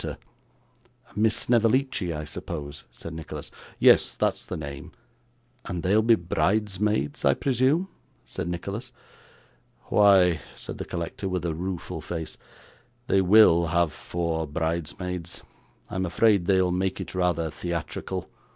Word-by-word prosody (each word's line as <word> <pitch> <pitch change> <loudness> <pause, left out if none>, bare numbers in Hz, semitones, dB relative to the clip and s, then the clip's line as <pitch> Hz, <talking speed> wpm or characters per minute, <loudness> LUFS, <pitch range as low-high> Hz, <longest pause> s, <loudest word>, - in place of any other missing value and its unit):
'Miss 110 +1 +3
Snevellicci, 120 -4 +2
I 75 -1 -4
suppose?' 75 -1 -6
said 85 - -9
Nicholas. 80 -1 -7 0.3
'Yes, - - +5
that's - - 0
the - - -5
name.' 70 -1 -7 0.7
'And 90 -1 -4
they'll 100 +4 +4
be 115 +1 +5
bridesmaids, 100 -2 0
I 70 - +4
presume?' 135 +7 +2 0.4
said - - -5
Nicholas. 100 +8 -5 1.0
'Why,' 95 -5 +5 0.2
said - - -8
the - - -4
collector, 85 +3 -4
with 90 -2 -2
a 85 - 0
rueful 90 0 -4
face, 80 -2 -6 0.7
'they 95 -5 +3
WILL 90 -3 +6
have 85 -1 +1
four 80 -2 -3
bridesmaids; 85 +2 -3 0.4
I'm 95 0 -2
afraid 100 0 +3
they'll 95 -1 +3
make 95 +1 -1
it - - -6
rather 85 -3 0
theatrical. 85 -1 -4
90 Hz, 125 wpm, -26 LUFS, 80-105 Hz, 1.0 s, WILL